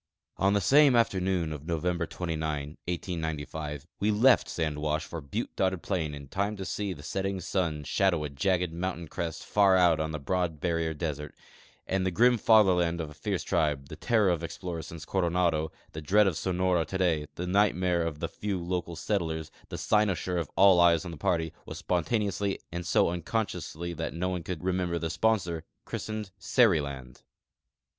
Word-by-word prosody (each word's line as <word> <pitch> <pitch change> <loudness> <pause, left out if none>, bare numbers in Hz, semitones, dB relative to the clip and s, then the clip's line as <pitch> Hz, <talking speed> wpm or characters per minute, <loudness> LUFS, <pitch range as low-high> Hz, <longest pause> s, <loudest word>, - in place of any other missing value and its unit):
On 100 +1 +3
the 100 - +2
same 140 +4 +6
afternoon 95 -7 +1
of 75 +1 -9
November 85 0 -1
29, 80 -4 -3 0.2
1895, 80 -4 -4
we 105 - +1
left 120 +5 +4
sand 75 -3 -2
wash 75 +1 -1
for 85 - -6
butte 70 -1 -4
dotted 95 -2 0
plain 80 -7 -2
in 70 -1 -10
time 100 +7 -1
to 95 - -5
see 100 0 -2
the 75 -5 -8
setting 95 +3 -2
sun 85 -4 -1
shadow 85 0 +1
a 75 - -3
jagged 90 +2 0
mountain 85 -1 -3
crest 80 +1 -4
far 100 -2 +4
out 85 -3 +4
on 80 0 -1
the 80 - -3
broad 80 +2 -1
barrier 85 -1 -1
desert; 75 -2 -4 0.5
and 95 0 0
the 95 - +1
grim 120 +6 +4
fatherland 90 -6 +4
of 80 -2 -4
a - - -10
fierce 85 +3 -3
tribe, 70 -3 0
the - - -7
terror 105 +2 +2
of 85 -1 -1
explorers 85 -1 -5
since 80 -2 -8
Coronado, 85 -4 +1 0.2
the 80 - -6
dread 105 +8 +4
of 95 -4 +1
Sonora 90 0 +1
today, 85 -3 0
tlie 90 - -4
nightmare 90 -2 +2
of 80 -3 -2
the - - -2
few 100 -3 -3
local 85 -1 -3
set 100 +4 0
tlers, 80 -1 -4 0.2
the - - -5
cynosure 95 -4 +1
of 80 - -3
all 95 -2 +6
eyes 85 -1 +5
of 90 - -5
the 85 - -8
party, 80 +1 0
was - - -6
spontaneously, 100 +2 0
and 85 0 -4
so - - +4
uncon.sciously 85 -2 -3
that - - -4
no 90 +2 -1
one 90 -1 -2
could 85 +1 -5
remember 90 -2 0
the 80 -1 -2
sponsor, 90 -6 0 0.2
chris - - -5
tened 110 -3 -4
Seriland. 70 - +1
85 Hz, 180 wpm, -29 LUFS, 80-95 Hz, 0.5 s, same